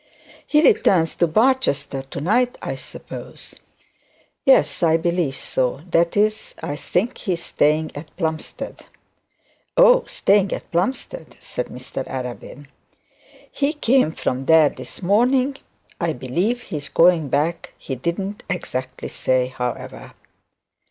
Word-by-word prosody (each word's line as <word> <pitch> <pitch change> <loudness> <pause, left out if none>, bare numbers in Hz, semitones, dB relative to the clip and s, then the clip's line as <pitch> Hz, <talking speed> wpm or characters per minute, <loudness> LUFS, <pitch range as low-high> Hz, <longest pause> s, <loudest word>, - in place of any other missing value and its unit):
'He 300 +1 +4
returns 170 - +4
to 175 - +3
Barchester 215 - +1
to 135 +1 -8
night, 240 - +1
I - - -4
suppose.' - - -9 0.9
'Yes, 270 - +4
I 165 -1 +4
believe 170 -4 0
so; 130 +1 -1
that 170 +3 +2
is, 215 +1 0
I 145 - -3
think 195 - -1
he 190 - -1
is 170 0 -5
staying 155 +1 +1
at 150 +2 -10
Plumstead.' 160 -3 -4 0.9
'Oh, - - +7
staying 200 -1 +2
at - - -7
Plumstead,' 255 - -2
said - - -5
Mr - - -6
Arabin. 130 +2 -6 0.9
'He 285 +1 0
came 260 - +3
from 130 -4 -3
there 160 -1 +6
this - - -8
morning. 250 +8 +2 0.4
I 170 -2 0
believe 175 - -1
he 155 - -5
is 145 - -6
going 165 -4 +4
back; 155 +5 -1
he 135 - -6
didn't 185 +9 -3
exactly 130 -7 -4
say, 130 -1 0
however.' 125 -1 -5
170 Hz, 130 wpm, -21 LUFS, 145-220 Hz, 0.9 s, Oh